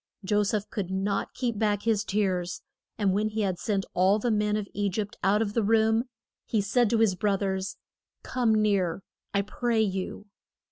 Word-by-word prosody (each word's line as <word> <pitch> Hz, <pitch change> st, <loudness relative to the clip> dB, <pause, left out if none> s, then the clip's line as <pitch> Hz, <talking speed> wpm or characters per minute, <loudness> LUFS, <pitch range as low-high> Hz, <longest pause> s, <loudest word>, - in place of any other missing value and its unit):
Jo 205 Hz, +2 st, +2 dB
seph 205 Hz, 0 st, -1 dB
could 195 Hz, -4 st, -3 dB
not 195 Hz, +1 st, -1 dB
keep 235 Hz, -5 st, -2 dB
back 210 Hz, -2 st, +1 dB
his 220 Hz, -3 st, +2 dB
tears, 190 Hz, -4 st, -1 dB, 0.3 s
and 200 Hz, -4 st, +2 dB
when 210 Hz, +2 st, +1 dB
he 215 Hz, +1 st, -2 dB
had 190 Hz, -4 st, -1 dB
sent 200 Hz, -3 st, -1 dB
all 190 Hz, +3 st, +4 dB
the 235 Hz, +2 st, 0 dB
men 210 Hz, 0 st, +1 dB
of 210 Hz, -1 st, -3 dB
E 205 Hz, -1 st, 0 dB
gypt 205 Hz, +2 st, -3 dB
out 205 Hz, +3 st, +3 dB
of 205 Hz, -2 st, -4 dB
the 230 Hz, -, +2 dB
room, 220 Hz, +2 st, +3 dB, 0.4 s
he 220 Hz, -, +1 dB
said 215 Hz, +3 st, +2 dB
to 230 Hz, -, +2 dB
his 220 Hz, -3 st, +4 dB
broth 200 Hz, +1 st, 0 dB
ers, 190 Hz, 0 st, -2 dB, 0.5 s
Come 240 Hz, -4 st, +1 dB
near, 200 Hz, -4 st, +1 dB, 0.3 s
I 200 Hz, 0 st, +1 dB
pray 230 Hz, +2 st, 0 dB
you. 195 Hz, 0 st, -3 dB
205 Hz, 190 wpm, -27 LUFS, 195-220 Hz, 0.5 s, all